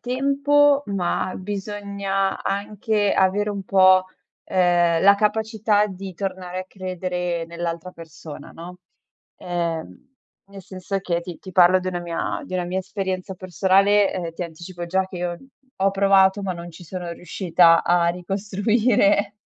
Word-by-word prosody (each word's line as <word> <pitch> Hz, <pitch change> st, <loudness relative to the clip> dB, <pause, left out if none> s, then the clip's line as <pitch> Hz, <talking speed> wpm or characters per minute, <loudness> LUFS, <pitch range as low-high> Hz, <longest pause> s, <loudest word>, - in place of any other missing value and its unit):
tempo, 280 Hz, +2 st, +2 dB
ma 185 Hz, -1 st, -1 dB
bisogna 200 Hz, 0 st, -3 dB
anche 205 Hz, +1 st, -1 dB
avere 200 Hz, +2 st, +2 dB
un 200 Hz, -1 st, -4 dB
po', 185 Hz, -1 st, +5 dB, 0.4 s
ehm, 175 Hz, -2 st, +2 dB
la 200 Hz, +1 st, +7 dB
capacità 215 Hz, 0 st, +1 dB
di 190 Hz, -1 st, -8 dB
tornare 185 Hz, -1 st, -4 dB
a -, -, -7 dB
credere 180 Hz, -2 st, -4 dB
nell'altra 170 Hz, +1 st, -5 dB
persona, 160 Hz, -2 st, -11 dB
no? 180 Hz, +2 st, -10 dB, 0.6 s
Ehm, 175 Hz, +9 st, -5 dB, 0.3 s
nel 195 Hz, -1 st, -11 dB
senso 185 Hz, +1 st, -5 dB
che 170 Hz, -2 st, -1 dB
ti 175 Hz, -1 st, -9 dB
ti 185 Hz, -, -11 dB
parlo 180 Hz, +1 st, +6 dB
di 185 Hz, -, -4 dB
una 175 Hz, -1 st, -3 dB
mia 170 Hz, -1 st, -3 dB
di 185 Hz, -, -7 dB
una 180 Hz, -1 st, -1 dB
mia 180 Hz, +2 st, -2 dB
esperienza 190 Hz, -1 st, -4 dB
personale 195 Hz, +3 st, +2 dB
e 170 Hz, -2 st, -4 dB
ti 170 Hz, -, -6 dB
anticipo 175 Hz, +1 st, -8 dB
già 190 Hz, +2 st, 0 dB
che 185 Hz, -, -9 dB
io 175 Hz, 0 st, -3 dB, 0.4 s
ho 195 Hz, +1 st, +3 dB
provato, 195 Hz, 0 st, +4 dB
ma 190 Hz, -2 st, -2 dB
non 170 Hz, 0 st, -8 dB
ci 170 Hz, -, -13 dB
sono 175 Hz, 0 st, -6 dB
riuscita 170 Hz, -1 st, +3 dB
a 175 Hz, -1 st, +3 dB
ricostruire 205 Hz, +3 st, +1 dB
185 Hz, 145 wpm, -22 LUFS, 175-200 Hz, 0.6 s, la